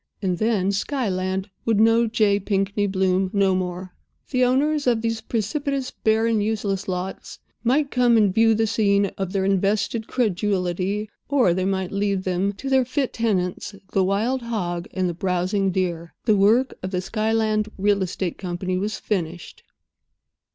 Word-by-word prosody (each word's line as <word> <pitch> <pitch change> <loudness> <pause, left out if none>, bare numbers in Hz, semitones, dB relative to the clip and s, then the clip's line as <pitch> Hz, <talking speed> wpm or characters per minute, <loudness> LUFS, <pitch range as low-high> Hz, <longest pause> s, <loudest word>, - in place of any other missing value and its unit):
And 185 -3 -1
then 215 -4 +1
Skyland 195 -4 -2
would 225 -3 +1
know 225 +1 +4
J. 215 -3 +2
Pinkney 200 +1 0
Bloom 190 -1 +1
no 195 -2 +3
more. 185 0 -3 0.4
The 255 -2 +2
owners 285 +3 +2
of 235 -2 +2
these 225 -1 -1
precipitous, 265 +5 -2
barren, 220 0 +1
useless 205 -2 -2
lots 185 0 -5 0.3
might 275 +4 +2
come 245 -2 +4
and 205 -4 +3
view 225 +1 +4
the 225 +1 +2
scene 200 -2 +2
of 190 -2 -2
their 195 -1 0
invested 200 +3 0
credulity, 200 -2 -1 0.2
or 260 -11 +3
they 185 +1 -1
might 190 -1 -1
leave 200 -1 0
them 185 +2 0
to 270 - -8
their 265 -1 +4
fit 260 +2 -2
tenants, 200 -3 -1 0.2
the 195 - +2
wild 220 +7 0
hog 180 -7 -3
and 185 -1 -1
the 175 - -2
browsing 185 +2 0
deer. 170 -3 -2
The 215 -3 +4
work 220 +7 +3
of 185 - -4
the 180 -1 -2
Skyland 215 +1 0
Real 200 0 +2
Estate 185 -1 -3
Company 185 0 -3
was 205 +1 -2
finished. 175 -5 -4
200 Hz, 160 wpm, -23 LUFS, 185-225 Hz, 0.4 s, know